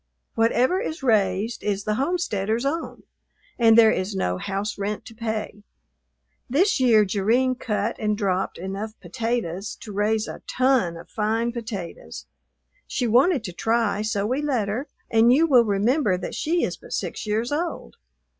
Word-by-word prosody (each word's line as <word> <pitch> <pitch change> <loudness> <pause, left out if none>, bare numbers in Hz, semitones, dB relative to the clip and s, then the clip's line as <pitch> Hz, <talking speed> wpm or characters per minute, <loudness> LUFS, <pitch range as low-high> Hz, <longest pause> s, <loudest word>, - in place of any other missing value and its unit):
Whatever 245 +9 +2
is 325 - -5
raised 210 -2 +1
is 200 -1 -1
the 215 - 0
homesteader's 240 - -1
own, 320 +4 -3 0.6
and 225 -1 +6
there 225 -1 +7
is 190 +2 -2
no 90 - -1
house 200 +2 -3
rent 205 +1 -3
to - - -11
pay. 220 -2 -4 0.9
This 365 - +2
year 225 -5 +5
Jerrine 225 +7 +2
cut 215 -3 -2
and 210 -1 0
dropped 190 -3 -1
enough 195 +5 -6
potatoes 205 -1 -3
to 210 - -8
raise 215 +2 0
a - - -8
ton 255 -10 +2
of - - -11
fine 225 +2 -1
potatoes. 190 - -7 0.6
She 245 - -1
wanted 255 +5 +3
to 180 - -6
try, 225 +1 0
so 205 -2 -1
we 255 +6 0
let 255 -9 0
her, 250 +8 -3 0.2
and 225 +1 +5
you 300 +6 +5
will 250 -7 +5
remember 210 +1 +2
that - - -6
she 335 +2 0
is - - -2
but - - -10
six - - -4
years 220 +4 -1
old. 300 - -3
220 Hz, 160 wpm, -24 LUFS, 200-250 Hz, 0.9 s, there